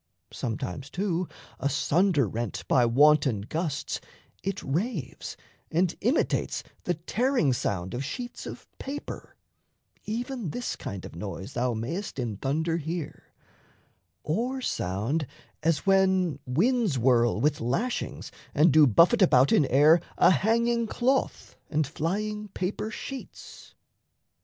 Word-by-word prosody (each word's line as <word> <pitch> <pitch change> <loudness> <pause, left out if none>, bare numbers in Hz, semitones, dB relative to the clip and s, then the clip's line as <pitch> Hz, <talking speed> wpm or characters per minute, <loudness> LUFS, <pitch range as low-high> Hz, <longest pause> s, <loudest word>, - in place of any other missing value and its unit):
Sometimes, 115 +3 -4
too, 180 -2 -1 0.3
Asunder 145 - +2
rent 105 -4 -4
by 125 -3 +4
wanton 135 -3 +4
gusts, 155 - -3 0.4
it 195 0 -3
raves 165 - -3 0.3
And 175 +1 +1
imitates 245 +9 +1 0.2
the 175 - +1
tearing 210 - +1
sound 95 -6 -2
of 125 +3 -2
sheets 240 - -6
Of - - -8
paper 280 +2 -7 0.7
even 235 - -3
this 245 +10 -3
kind 100 -3 -6
of - - -10
noise 95 +1 -6
thou 120 0 0
mayst 160 - -4
In 115 -6 -3
thunder 160 - 0
hear 165 0 -5 1.0
or 240 +12 -1
sound 125 - -1 0.3
as 160 +1 +1
when 190 -5 +3
winds 200 - +2
whirl 120 -2 +3
With 150 +4 +1
lashings 170 - -2 0.2
and 155 +3 +5
do 155 -2 +7
buffet 170 - +5
about 135 -7 +5
in 145 - +4
air 150 +5 +6 0.2
A 175 - +6
hanging 230 - +2
cloth 260 +4 0
and 155 0 +1
flying 210 +9 -2
paper 195 +2 -3
sheets. 270 +3 -9
160 Hz, 120 wpm, -27 LUFS, 130-210 Hz, 1.0 s, do